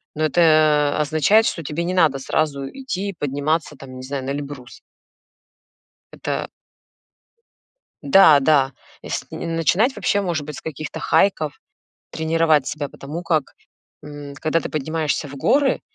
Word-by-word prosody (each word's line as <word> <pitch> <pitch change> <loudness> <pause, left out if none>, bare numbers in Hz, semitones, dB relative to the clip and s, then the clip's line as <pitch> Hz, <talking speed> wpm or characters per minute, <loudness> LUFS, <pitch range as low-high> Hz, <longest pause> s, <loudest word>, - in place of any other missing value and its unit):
ну, 155 - -2
это 155 -2 +3
означает, 160 +9 +3
что 165 - -2
тебе 155 +4 -3
не 180 - -2
надо 160 -7 +3
сразу 140 0 -1
идти 200 - -5
подниматься, 145 +3 -1
там, 130 -1 -11
не 130 - -8
знаю, 135 0 -4
на - - -4
Эльбрус. 140 -3 -7 1.3
Это - - -4 1.6
Да, 195 - +7
да, 135 -2 +3 0.3
есл - - -4
начинать 170 - 0
вообще, 205 - 0
может 170 -6 -2
быть, 150 0 -7
с - - -9
каких-то 155 -1 -6
хайков, 155 -7 +1 0.5
тренировать 160 -2 +2
себя, 145 -2 -4
потому 150 +5 -7
как, 160 -5 -1 0.5
м, 145 -1 -9
когда 155 +4 0
ты - - -6
поднимаешься 155 0 -2
в 140 - -10
горы, 275 - +2
155 Hz, 135 wpm, -21 LUFS, 145-165 Hz, 1.6 s, Да